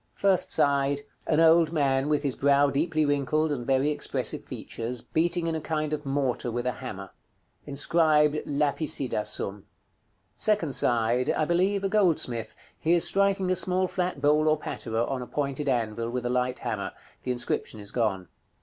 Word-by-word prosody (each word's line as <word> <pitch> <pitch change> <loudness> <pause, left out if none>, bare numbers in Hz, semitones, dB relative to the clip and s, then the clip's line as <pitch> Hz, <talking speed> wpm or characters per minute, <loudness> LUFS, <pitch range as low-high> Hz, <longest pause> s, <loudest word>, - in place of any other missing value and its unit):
First 195 -2 +1
side. 140 0 +2 0.3
An 155 - +2
old 165 0 +5
man, 140 -3 +1
with 150 -1 +1
his 140 -3 -1
brow 140 0 +3
deeply 155 +2 +1
wrinkled, 145 +2 +1
and 125 -5 -4
very 135 +2 +2
expressive 150 - -2
features, 120 +1 -6
beating 170 +1 0
in 165 - -1
a 160 - -3
kind 155 -1 -2
of 150 -1 -4
mortar 135 -3 -1
with 120 +1 -3
a 125 - +1
hammer. 105 -6 -8 0.6
Inscribed 150 +1 +2
"LAPICIDA 145 -4 0
SUM." 100 0 -4 0.7
Second 200 - +1
side. 120 +1 +1
I 155 - +1
believe, 190 +4 +1
a - - +2
goldsmith; 150 - 0 0.2
he 165 +2 +2
is 170 - +4
striking 195 -1 +2
a - - +2
small 185 +1 +2
flat 180 -4 -2
bowl 150 +2 +3
or 155 0 +3
patera, 115 -5 -3
on 130 0 -3
a 125 - -7
pointed 140 0 -2
anvil, 115 -2 -1
with 125 0 -3
a 120 - 0
light 125 0 0
hammer. - - -4 0.3
The - - -6
inscription 120 -2 -3
is 100 -1 -7
gone. 100 -6 -1
145 Hz, 170 wpm, -27 LUFS, 125-160 Hz, 0.7 s, old